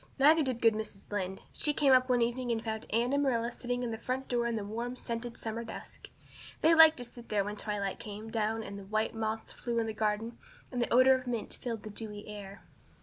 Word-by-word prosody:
Neither 305 +4 +6
did 255 -5 -1
good 225 -1 +6
Mrs. 215 -2 -6
Lynde. 190 -2 -3
She 295 -2 +1
came 280 -3 +5
up 255 0 +5
one 245 -1 +4
evening 240 +1 -1
and 225 -1 -1
found 220 -1 -3
Anne 235 +4 +1
and 285 - +3
Marilla 240 -4 +1
sitting 245 0 -3
at 240 - -2
the 225 - -4
front 260 +1 -2
door 240 -1 +1
in 235 - -1
the 210 -2 -3
warm, 235 +4 -4
scented 235 -1 -4
summer 225 +1 -4
dusk. - - -9 0.5
They 325 - +6
liked 320 -1 +8
to 245 - -5
sit 240 0 -12
there 205 -2 +2
when 205 +1 -4
the 210 - -8
twilight 200 -2 -2
came 215 +1 -7
down 220 0 0
and 200 -1 -7
the 195 - -10
white 215 +2 0
moths 220 0 -3
flew 240 - -4
about 230 - +2
in - - -1
the 220 - -3
garden 215 +2 -1 0.3
and 250 -2 -1
the - - -1
odor 255 +2 +7
of 255 -1 -2
mint 235 -3 -2
filled 230 -3 -4
the 215 - -7
dewy 210 -1 -6
air. 200 -1 -9
230 Hz, 250 wpm, -31 LUFS, 215-245 Hz, 0.5 s, liked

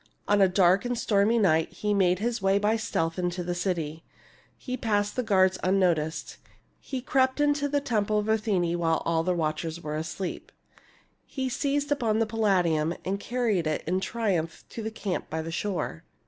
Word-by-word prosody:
On 205 0 +3
a 195 - +7
dark 185 0 +4
and 245 0 -2
stormy 210 +1 +2
night 165 -7 +3
he 210 +3 -1
made 185 -2 +3
his 230 +2 -2
way 195 +1 +3
by 210 +2 +2
stealth 165 -6 -1
into 180 0 -2
the 175 0 -2
city; 170 -3 -2 0.5
he 255 - -4
passed 205 -4 0
the 255 - +1
guards 190 -4 +3
unnoticed; 170 -5 +1 0.4
he 260 -2 -5
crept 260 +1 +1
into 290 0 +2
the 285 0 +1
temple 215 -5 0
of 210 0 -1
Athene 195 -6 +1
while 165 -1 +1
all 165 -1 +2
the 180 +2 0
watchers 160 0 -2
were 150 -2 -5
asleep; 170 +4 -5 0.7
he 260 -2 -3
seized 285 +2 -1
upon 230 -7 +1
the 225 - +2
Palladium 180 -7 +1
and 195 +2 -1
carried 220 -8 0
it 155 - -1
in 185 +3 0
triumph 190 -6 -2
to 230 - -6
the 220 - -3
camp 210 -4 -4
by 160 0 -3
the 165 - -5
shore. 175 - -3
195 Hz, 180 wpm, -27 LUFS, 170-225 Hz, 0.7 s, a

